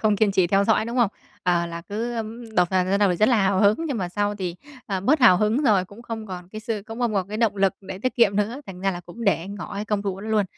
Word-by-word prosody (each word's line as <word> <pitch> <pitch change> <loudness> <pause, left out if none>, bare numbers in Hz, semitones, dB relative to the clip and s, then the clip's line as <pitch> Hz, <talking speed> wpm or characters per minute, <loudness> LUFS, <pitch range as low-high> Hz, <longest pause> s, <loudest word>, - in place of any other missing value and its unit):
không 210 -2 +2
kiên 205 -1 +2
trì 185 -2 +3
theo 195 +2 +3
dõi, 220 0 +3
đúng 235 +2 -4
không? 235 -5 +3 0.3
Ờ, 175 -1 +1
là 170 0 -6
cứ, 230 +6 -4
ừm, 225 0 -6
đầu 180 -1 +5
vào 185 -1 +2
ban 195 +2 +1
đầu 200 -3 +4
thì 175 - 0
rất 215 +5 +4
là 245 - +4
hào 190 0 +2
hứng, 205 0 +5
nhưng 265 -7 -2
mà 180 -2 -2
sau 205 +2 -1
thì, 180 -3 -4 0.3
ờ, 195 -2 -2
bớt 275 +10 +2
hào 185 -7 +7
hứng 215 +8 +1
rồi, 205 -8 +3
cũng 205 +5 -14
không 225 -2 -6
còn 180 -2 -8
cái 215 +2 -8
sự 220 -2 -3
cũng 225 +1 -8
không 235 -3 0
còn 190 -1 -1
cái 215 - -4
động 220 -3 +1
lực 195 0 +3
để 190 -1 -8
tiết 255 +4 -2
kiệm 205 -4 +4
nữa, 225 +7 -1
thành 185 -1 -9
ra 195 0 +1
là 175 - -5
cũng 180 +7 -9
để 175 -2 +1
ngỏ 200 -1 -7
cái 205 +1 -3
công 205 -1 -1
thủ 195 -1 -3
đó 210 - -7
luôn. 215 -2 +2
205 Hz, 310 wpm, -24 LUFS, 190-220 Hz, 0.3 s, hào